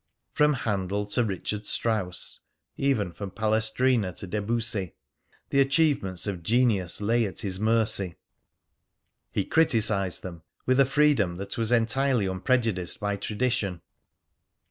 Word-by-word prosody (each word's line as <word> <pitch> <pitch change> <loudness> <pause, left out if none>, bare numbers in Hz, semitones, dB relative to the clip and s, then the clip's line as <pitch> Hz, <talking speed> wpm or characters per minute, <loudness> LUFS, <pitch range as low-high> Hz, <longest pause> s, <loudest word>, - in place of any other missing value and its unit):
From 150 0 +4
Handel 100 -5 -2
to 105 +4 0
Richard 105 0 -3
Strauss, 105 -6 -1 0.4
even 115 -10 0
from 100 +3 -7
Palestrina 110 +1 +1
to 100 - -7
Debussy, 105 -2 -2 0.6
the 140 - +3
achievements 135 - +2
of 100 -4 -3
genius 105 -3 +2
lay 115 +3 +2
at 95 +2 -6
his 95 -4 -3
mercy. 110 -5 +1 1.2
He - - -1
criticised 105 - +2
them 85 -3 -8 0.2
with 130 +1 +2
a 140 - +7
freedom 135 -10 +2
that 100 +2 -5
was 115 0 -1
entirely 120 0 +2
unprejudiced 95 -1 0
by 105 0 -1
tradition. 105 -4 -2
110 Hz, 120 wpm, -26 LUFS, 95-125 Hz, 1.2 s, a